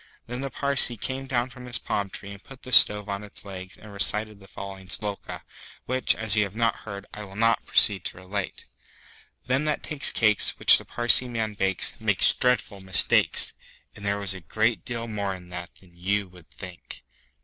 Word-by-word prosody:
Then 125 +2 -6
the 135 - -4
Parsee 140 -2 +5
came 135 +5 -5
down 125 -1 -1
from 125 0 -12
his 120 - +2
palm 100 -1 -3
tree 100 +1 -10
and 100 0 -12
put 135 -1 -15
the 130 - -10
stove 105 -3 +5
on 100 0 -5
its 105 0 -12
legs 95 -1 -9
and 105 -1 -14
recited 105 +1 +1
the 95 - -16
following 95 -1 -10
Sloka, 105 0 -5 0.4
which, 130 +1 +1
as 110 -2 +1
you 105 - +3
have 100 0 -7
not 115 0 +1
heard, 100 -1 -7
I 105 - -8
will 95 -1 -12
now 115 +2 +2
proceed 100 -5 +5
to - - -6
relate: 95 +2 -6 0.8
Them 130 +4 0
that 150 -1 -2
takes 150 -2 0
cakes 110 -3 +1
Which - - +7
the - - -13
Parsee 120 +1 +5
man 110 -2 -3
bakes 95 -2 0
Makes - - +3
dreadful 120 -5 -1
mistakes. 95 -2 +2 0.4
And 105 - -13
there 100 0 -1
was 100 -2 -1
a 95 - -9
great 110 +8 -1
deal 115 -1 -5
more 100 -3 -4
in 90 -1 -14
that 85 -1 -8
than 90 -2 -23
you 100 +3 -2
would 90 -2 -18
think. 90 -3 -11
105 Hz, 200 wpm, -25 LUFS, 95-120 Hz, 0.8 s, Which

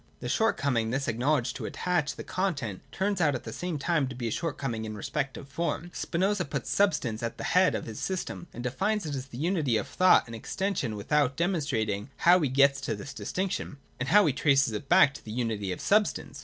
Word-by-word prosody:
The - - -5
shortcoming 140 - +1
thus 135 +3 -1
acknowledged 125 +3 +1
to - - -5
attach 175 -5 -1
to - - -5
the - - -6
con 185 -2 -1
tent 115 -9 -5
turns 195 -1 -1
out 145 -4 +3
at 125 - -5
the - - -7
same 175 -3 -3
time 155 -1 +1
to 130 - -7
be 120 -1 -3
a - - -2
shortcoming 135 -7 -3
in 110 -1 -5
respect 135 +5 -3
of 140 - -9
form. 170 +4 -3
Spinoza 190 +2 0
puts 140 -4 -4
substance 130 - +1
at 115 -1 -3
the - - -6
head 185 +1 +3
of - - -3
his 110 -2 -7
system, 185 -2 -4
and 120 - -7
defines 195 - -1
it 150 - -3
to 140 - -2
be 130 -2 -9
the 140 - -3
unity 160 - +1
of - - -3
thought 185 0 +5
and 115 - -7
exten 195 - -2
sion, 115 -9 -2
without 140 +6 +1
demonstrating 140 - -1
how 175 +2 +6
he 150 -5 +1
gets 140 +1 +4
to 115 -5 -2
this 105 +8 -8
distinction, 180 0 -3 0.2
or 130 - -1
how 205 +6 +6
he 145 - +2
traces 140 -4 +3
it 135 +6 -5
back 175 -6 +6
to - - -11
the 110 - -8
unity 110 -5 -2
of - - -4
substance. 210 +1 +1
140 Hz, 235 wpm, -28 LUFS, 120-175 Hz, 0.2 s, how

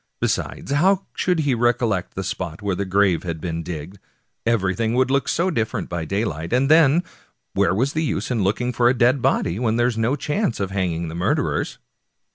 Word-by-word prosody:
Besides, - - -2
how 185 +7 +3
should 180 -3 +1
he 145 -3 +1
recollect 115 -5 0
the 95 - -3
spot 90 -2 -5
where 100 -2 0
the 100 - -2
grave 95 -2 +2
had 85 -3 -4
been 85 0 -3
digged? 85 +3 -7 0.5
everything 110 0 +1
would 130 +1 +2
look 140 0 +1
so 180 +3 +1
different 110 -9 -2
by 85 -2 -3
daylight. 90 -4 -2
And 135 +4 +3
then, 160 +1 +5 0.5
where 85 - +2
was 130 +7 0
the 155 - 0
use 150 - -2
of 120 - 0
looking 110 +6 0
for 120 +1 +3
a 130 - +2
dead 125 +2 +3
body 90 -3 +1
when 115 -2 +1
there 120 +1 +2
was 120 -2 0
no 115 +5 +1
chance 150 - -1
of 95 -1 -2
hanging 85 -4 -1
the 80 - -6
murderers 85 +2 -1
110 Hz, 200 wpm, -22 LUFS, 95-130 Hz, 0.5 s, then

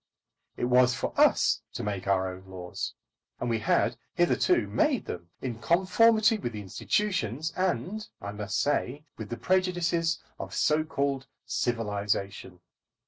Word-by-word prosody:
It - - 0
was 125 +1 +4
for - - -3
us - - +4
to - - -3
make 100 -2 -3
our 95 -1 +2
own 95 +1 -12
laws, 90 -2 -5 0.4
and 120 - -1
we 115 - +1
had 115 +2 +2 0.2
hitherto 345 - +3
made 295 -5 +1
them 85 -1 -6
in 120 -3 -3
conformity 215 - +4
with 120 - -4
the 105 - -5
institutions, 160 - -1
and, 190 +3 -1
I 100 - -5
must 105 0 -3
say, 145 0 0
with 110 - -6
the 120 - -4
prejudices 175 0 +1 0.2
of - - -6
so 155 +1 +3
called 140 -3 -2 0.2
civilisation. 100 -5 -2
125 Hz, 140 wpm, -28 LUFS, -, 0.4 s, was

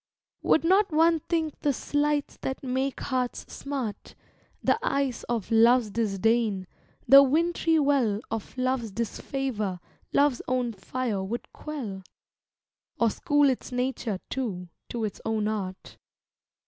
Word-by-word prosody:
Would 320 - +3
not 380 +3 +4
one 325 +1 +4
think 320 -1 -2
the 290 - +2
slights 290 +2 -1
that 265 - -4
make 265 +1 -1
hearts 255 -2 -2
smart, 270 -7 -5 0.5
The - - +3
ice 275 - 0
of 230 -3 -3
love's 230 0 +5
disdain, 215 -1 +1 0.4
the 275 +3 +10
wint'ry 325 +3 +2
well 275 -8 +2
Of 225 +2 -5
love's 255 -3 0
disfavor, 220 -2 -3 0.3
love's 285 -3 +3
own 250 -2 0
fire 220 -1 -3
would 225 +5 -5
quell? 245 -11 -6 1.0
Or 230 -2 +3
school 290 +4 +3
its 260 0 -1
nature, 250 -5 -2
too, 190 -9 -4 0.2
to 235 -2 -3
its 210 - -6
own 220 -1 0
art. 195 -3 -5
250 Hz, 125 wpm, -27 LUFS, 220-280 Hz, 1.0 s, the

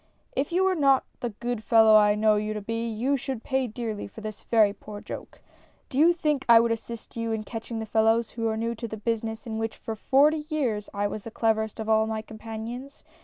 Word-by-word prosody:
" - - -35
If 290 - -5
you 365 +2 +2
were 380 0 +3
not 275 -5 +4 0.2
the 240 - -2
good 235 +1 -4
fellow 220 -1 +6
I 210 -1 +6
know 215 0 +3
you 215 +1 -2
to 210 - -3
be, 230 +2 -2
you 240 +6 0
should 260 -2 -5
pay 265 -1 0
dearly 220 -2 -4
for 220 - -11
this 215 -1 -7
very 215 -3 +3
poor 210 0 -9
joke! - - -9 0.5
Do 265 - -2
you 330 +3 +7
think 300 -5 0
I 230 -1 +9
would 230 0 +2
assist 230 0 -6
you 230 -1 -2
in 220 -1 -2
catching 225 +1 -6
the 220 - -3
fellows 225 +1 +2
who 230 -1 -2
are 220 0 -1
new 230 +1 -1
to 230 +1 -6
the 220 - -6
business 225 0 -3
in 220 -1 -4
which 225 0 -3
for 225 - -5
forty 295 +7 +3
years 240 -10 -1
I 205 0 -1
was 205 0 -3
the - - -7
cleverest 220 -1 0
of 220 - -4
all 220 0 +3
my 220 0 -3
companions 225 +5 -8
225 Hz, 235 wpm, -26 LUFS, 220-245 Hz, 0.5 s, I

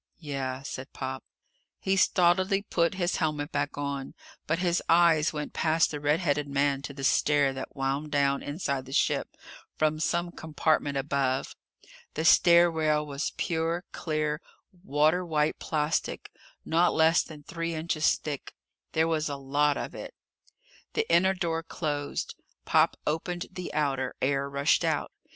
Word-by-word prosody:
"Yeah," 135 -4 -4
said 130 0 -7
Pop. 130 0 -5 0.6
He 190 - +1
stolidly 190 +2 +3
put 170 -2 0
his 180 -1 0
helmet 150 -1 -1
back 145 0 -2
on. 140 -1 -4 0.3
But 165 - +1
his 175 0 +1
eyes 165 -2 +5
went 150 -1 -5
past 160 +1 +2
the 150 - -4
red 150 +2 +2
headed 145 -3 0
man 140 0 +1
to 140 - -7
the 135 - -7
stair 145 0 +3
that 135 0 -7
wound 140 +2 -2
down, 140 -1 +2
inside 140 -3 -3
the 135 - -9
ship, - - 0 0.4
from 155 0 +1
some 170 +2 0
compartment 155 -3 0
above. 135 -1 -1 0.6
The 160 - -2
stair 170 +1 +6
rail 155 -2 +1
was 140 0 -3
pure, 165 +1 -1
clear, 155 -2 -2 0.4
water 155 +2 +2
white 155 -3 0
plastic, 150 0 -2 0.3
not 170 +2 +2
less 160 +1 +5
than 150 -2 -11
three 165 0 -4
inches 155 -1 +1
thick. 145 -3 -6 0.4
There 160 0 +2
was 155 -2 0
a 140 - -3
lot 145 +2 +1
of - - -5
it! - - -8 0.8
The 450 0 0
inner 190 +2 +4
door 165 -3 -1
closed. 150 -3 -3 0.3
Pop - - +3
opened 175 +3 -2
the 180 -1 -6
outer. 135 -4 -1
Air 140 +1 0
rushed 140 0 +2
out. - - 0
150 Hz, 150 wpm, -28 LUFS, 140-165 Hz, 0.8 s, stair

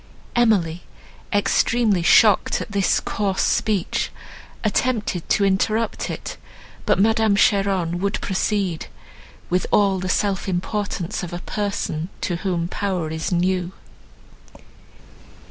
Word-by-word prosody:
Emily, 190 -8 +2 0.5
extremely 205 0 +2
shocked 205 +3 +5
at - - -6
this 200 -1 +2
coarse 195 -2 -1
speech, 205 -5 0 0.5
attempted 215 -5 -1
to 200 - +3
interrupt 215 +3 0
it; - - -6 0.5
but - - +4
Madame 220 +1 +3
Cheron 195 -4 +2
would 200 +2 -1
proceed, 190 -3 -1 0.6
with 180 +1 +1
all 195 -2 +3
the 185 0 -3
self 200 0 0
importance 190 -1 -2
of 175 -2 -6
a 175 - -4
person, 200 -5 -3
to 175 - -1
whom 175 -3 -1
power 180 -4 -2
is 160 +3 -3
new. 180 0 0
195 Hz, 110 wpm, -22 LUFS, 175-210 Hz, 0.6 s, shocked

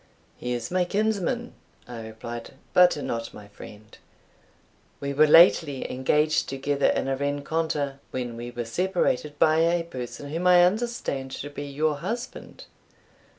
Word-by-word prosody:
"He 125 0 -4
is 120 -1 -4
my 185 0 +2
kinsman," 220 +5 -1 0.3
I 120 -2 -7
replied, 115 +3 -8 0.2
"but 180 -2 +6
not 115 -5 -4
my 105 -1 -12
friend. 105 +1 -13 1.0
We 140 0 -3
were 155 +2 +5
lately 155 -3 +5
engaged 150 +4 +1
together 140 +1 0
in - - 0
a 135 - 0
rencontre, 145 0 -2
when 125 -2 -4
we 120 +1 -6
were 120 -1 -5
separated 150 0 -1
by 155 +1 +4
a 170 +1 +2
person 140 -1 -7
whom 170 +3 -1
I 175 -1 +7
understand 195 - -2
to 145 - -6
be 145 0 -6
your 150 +1 0
husband. 235 - -6
145 Hz, 145 wpm, -25 LUFS, 125-175 Hz, 1.0 s, I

